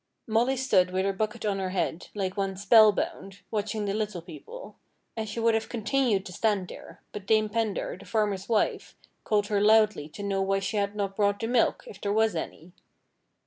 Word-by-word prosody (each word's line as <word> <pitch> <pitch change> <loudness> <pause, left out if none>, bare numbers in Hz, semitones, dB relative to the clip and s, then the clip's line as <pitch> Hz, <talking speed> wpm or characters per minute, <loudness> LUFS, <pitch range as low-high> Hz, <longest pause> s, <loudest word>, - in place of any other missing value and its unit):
Molly 235 +4 +1
stood 190 -8 +3
with 185 +1 -1
her 195 - +1
bucket 215 +2 -3
on 200 -2 0
her 190 -1 -2
head, 180 -2 -2
like 190 -2 -2
one 195 -2 -2
spell 215 +2 +7
bound, 195 -1 -5
watching 210 0 -2
the 200 - -1
Little 210 -5 -3
People; 185 - -11 0.4
and 220 -1 -4
she 225 - -4
would 230 0 +3
have 225 0 -1
continued 230 -3 0
to 180 - -8
stand 205 -2 0
there, - - -12
but 200 -2 -8
Dame 215 -1 +3
Pendar, 220 -2 -2
the - - -13
farmer's 205 -3 -1
wife, 220 -2 0 0.3
called 210 -1 +1
her 205 -1 0
loudly 215 -7 +4
to 205 - -8
know 195 -1 -1
why 195 0 +1
she 195 +2 -2
had 200 0 -1
not 200 -2 -2
brought 205 -1 +1
the 225 - -2
milk, 240 0 +2
if 475 - -12
there 200 - -1
was 220 -2 +2
any. 165 +1 -6
205 Hz, 205 wpm, -27 LUFS, 195-220 Hz, 0.4 s, spell